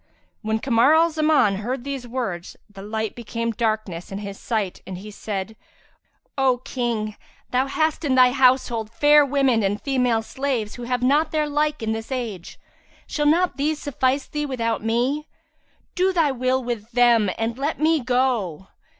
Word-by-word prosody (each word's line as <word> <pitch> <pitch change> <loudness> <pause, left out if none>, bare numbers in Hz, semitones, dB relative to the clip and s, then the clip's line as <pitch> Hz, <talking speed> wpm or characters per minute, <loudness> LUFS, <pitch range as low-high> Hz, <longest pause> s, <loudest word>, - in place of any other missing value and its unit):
"[FN#338] - - -41
When 220 0 0
Kamar 250 +4 +4
al 330 +1 +4
Zaman 305 -10 +3
heard 240 +5 -4
these 275 -3 -5
words, 230 -9 -4
the 205 -2 -12
light 220 +1 -3
became 230 0 -3
darkness 215 -6 -2
in 195 - -4
his 200 -1 -7
sight 215 -6 -2
and 190 -1 -6
he 210 +3 -9
said, 205 0 -5 0.8
"O 260 -2 +3
King, 230 -4 -2 0.4
thou 255 +2 +1
hast 315 +3 0
in 275 -4 +1
thy 255 -1 +6
household 250 -4 +2
fair 295 +5 +5
women 270 -4 +2
and 205 +1 0
female 250 -5 +1
slaves, 255 -4 -2
who 245 - -7
have 250 0 -1
not 290 +5 +3
their 305 -1 0
like 295 -2 0
in 220 - -1
this 225 +3 -5
age: 225 -9 -5 0.5
shall 295 -1 -1
not 340 +3 +2
these 300 +2 0
suffice 270 -1 0
thee 295 0 -3
without 230 -5 -2
me? 250 +7 0 0.7
Do 370 +1 +2
thy 330 -6 +2
will 255 0 0
with 235 -3 -4
them 235 -4 +4
and 230 +2 -2
let 290 +3 -2
me 315 +1 +3
go!" 245 - -1
245 Hz, 170 wpm, -23 LUFS, 220-280 Hz, 0.8 s, thy